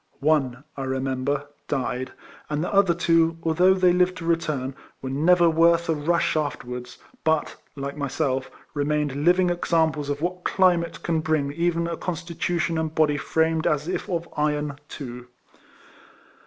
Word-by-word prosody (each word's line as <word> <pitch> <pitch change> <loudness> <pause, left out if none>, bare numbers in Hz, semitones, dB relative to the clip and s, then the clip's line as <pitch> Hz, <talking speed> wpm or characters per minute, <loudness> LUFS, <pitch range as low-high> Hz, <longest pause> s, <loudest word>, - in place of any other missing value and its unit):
One, 135 -4 +1
I 135 - -4
remember, 130 +2 -1 0.2
died; 130 -2 -2 0.4
and 150 +1 -1
the - - -3
other 195 -3 +4
two, 165 -1 +3
although 180 +4 +4
they 180 -2 +4
lived 180 0 +2
to 165 - -7
return, 155 -6 -1 0.3
were 130 - -5
never 170 +5 +4
worth 165 +1 +3
a - - +4
rush 160 +3 +1
afterwards, 125 -5 -4 0.3
but, 160 -1 +1 0.2
like 140 0 -5
myself, 135 -2 -1 0.2
remained 150 -1 0
living 180 0 +4
examples 160 -4 0
of 145 0 -2
what 180 +3 -3
climate 175 -3 +2
can 165 -2 +1
bring 155 -3 0
even 170 +1 0
a 170 -1 -3
constitution 170 -1 -2
and 160 0 -3
body 150 -2 +3
framed 160 +2 +1
as 150 -1 0
if 185 - -3
of 170 -2 -2
iron 150 -1 -1 0.2
to. 125 -3 -8
160 Hz, 150 wpm, -24 LUFS, 140-170 Hz, 0.4 s, other